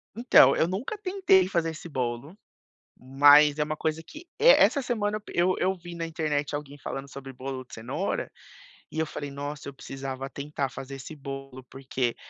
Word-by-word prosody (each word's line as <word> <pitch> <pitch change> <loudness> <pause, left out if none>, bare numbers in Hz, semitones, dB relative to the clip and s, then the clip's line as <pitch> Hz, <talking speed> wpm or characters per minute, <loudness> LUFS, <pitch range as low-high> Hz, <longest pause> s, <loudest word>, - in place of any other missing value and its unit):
Então, 230 - +6
eu 165 - +2
nunca 205 - -3
tentei 370 - +3
fazer 170 -3 0
esse 165 +1 -9
bolo, 130 - -4 0.6
mas 145 +3 +5
é 150 - +2
uma 155 0 -4
coisa 160 +1 -2
que, 310 - -12
essa 445 - +6
semana, 215 -4 -1
eu 180 +2 +2
eu 190 +1 +1
vi 175 -1 -10
na 165 -1 -4
internet 150 -3 -2
alguém 145 -1 -6
falando 135 0 -6
sobre 135 -1 -9
bolo 130 0 -6
de - - -24
cenoura, 110 +1 -3 0.6
e - - -8
eu 160 - +1
falei: 145 -1 -6
"Nossa, 145 +1 -6
eu 140 - -11
precisava 135 0 -6
tentar, 140 -1 -4
fazer 135 +2 -8
esse 145 +4 -9
bolo", 135 -2 -8
porque, 130 -2 -3
145 Hz, 175 wpm, -27 LUFS, 135-175 Hz, 0.6 s, Então